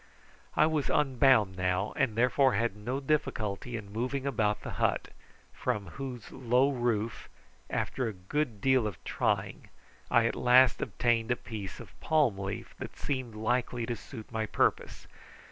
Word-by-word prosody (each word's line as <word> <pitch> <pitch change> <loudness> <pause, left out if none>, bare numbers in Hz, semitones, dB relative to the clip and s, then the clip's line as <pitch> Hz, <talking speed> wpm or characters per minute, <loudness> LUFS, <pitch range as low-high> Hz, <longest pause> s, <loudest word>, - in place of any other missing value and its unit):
I - - +5
was 155 -3 0
unbound 130 -8 +4
now, 90 +2 0
and 115 -5 +1
therefore 125 +3 +3
had 115 -3 0
no 120 +6 -3
difficulty 125 -6 -1
in 100 -2 -9
moving 130 +4 -2
about 110 -6 0
the - - -5
hut, - - +1 0.4
from 100 -4 -2
whose 125 0 -7
low 130 +2 +2
roof, 120 -3 -1 0.4
after 125 - -1
a 110 - -3
good 105 +4 -3
deal 130 -4 +3
of 100 - -6
trying, - - -1 0.4
I 115 -1 +4
at 115 - +1
last 125 0 +5
obtained 115 -1 +1
a 120 - +3
piece 105 -5 -7
of - - -13
palm 145 -11 +2
leaf 95 0 -5
that - - -7
seemed 130 -5 -3
likely 120 +2 0
to 120 0 -2
suit 115 0 -10
my 110 -1 -2
purpose. - - 0
120 Hz, 155 wpm, -30 LUFS, 105-130 Hz, 0.4 s, I